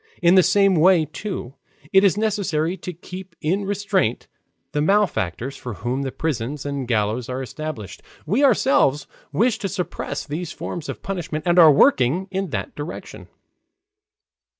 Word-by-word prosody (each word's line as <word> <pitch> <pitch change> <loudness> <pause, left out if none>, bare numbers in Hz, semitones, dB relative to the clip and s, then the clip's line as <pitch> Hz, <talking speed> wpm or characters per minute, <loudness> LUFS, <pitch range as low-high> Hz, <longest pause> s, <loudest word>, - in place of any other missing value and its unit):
In 175 0 +5
the 190 - +7
same 195 +1 +4
way, 170 0 +5
too, 160 - -6 0.4
it 195 0 +6
is 200 0 +4
necessary 190 -6 0
to 185 - -7
keep 180 +1 -10
in 190 +6 -1
restraint 200 - 0 0.4
the 150 - -1
malefactors 150 - 0
for 120 -4 -7
whom 120 +9 -2
the 135 -1 -3
prisons 145 -2 -3
and 140 -3 -3
gallows 110 +1 0
are 130 +1 -3
established. 130 - -7 0.2
We 240 +9 +1
ourselves 215 - +3 0.3
wish 225 - +1
to 195 - -3
suppress 185 -1 -4
these 165 +3 -5
forms 170 -3 -6
of - - -6
punishment 175 -5 -4
and 175 0 +4
are 160 -3 +9
working 170 - +3
in 195 -1 -2
that - - -4
direction." 150 +4 -8
165 Hz, 150 wpm, -22 LUFS, 140-195 Hz, 0.4 s, are